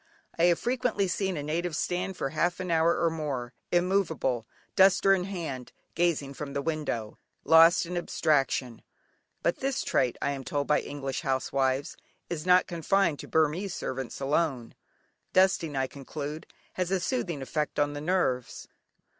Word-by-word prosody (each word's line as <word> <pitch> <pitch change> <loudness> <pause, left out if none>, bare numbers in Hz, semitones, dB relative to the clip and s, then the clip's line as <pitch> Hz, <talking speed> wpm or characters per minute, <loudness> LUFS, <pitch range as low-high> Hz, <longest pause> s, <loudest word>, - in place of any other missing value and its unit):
I 170 - +5
have 175 -1 +4
frequently 245 -5 0
seen 190 0 -1
a 145 - -3
native 165 +2 -2
stand 185 +2 -2
for 135 - -2
half 175 +4 0
an 185 -2 -3
hour 165 +1 +3
or 165 -1 +2
more, 140 -6 -4 0.2
immovable, 175 - +1 0.3
duster 195 0 +6
in 180 -2 0
hand, 160 -10 -5 0.2
gazing 160 -5 0
from 140 0 -6
the 140 - -1
window, 140 -9 -3 0.2
lost 165 +3 +6
in 180 +1 -5
abstraction. 135 -7 0 0.6
But 170 - +1
this 270 0 -1
trait, 125 -3 +1
I 140 - 0
am 135 -1 -5
told 145 +1 -2
by 150 - +2
English 135 -2 -4
housewives, 135 0 0 0.3
is 165 0 -4
not 180 0 +6
confined 170 -1 +1
to - - -8
Burmese 160 +5 +1
servants 130 -2 -4
alone. 135 -4 0 0.6
Dusting, 185 -5 +3
I 135 0 +1
conclude, 145 +3 -7 0.3
has 180 -1 -2
a 190 0 +1
soothing 175 - -2
effect 150 +4 -2
on 145 0 +1
the 145 - -5
nerves. 150 -8 -1
160 Hz, 155 wpm, -28 LUFS, 140-180 Hz, 0.6 s, duster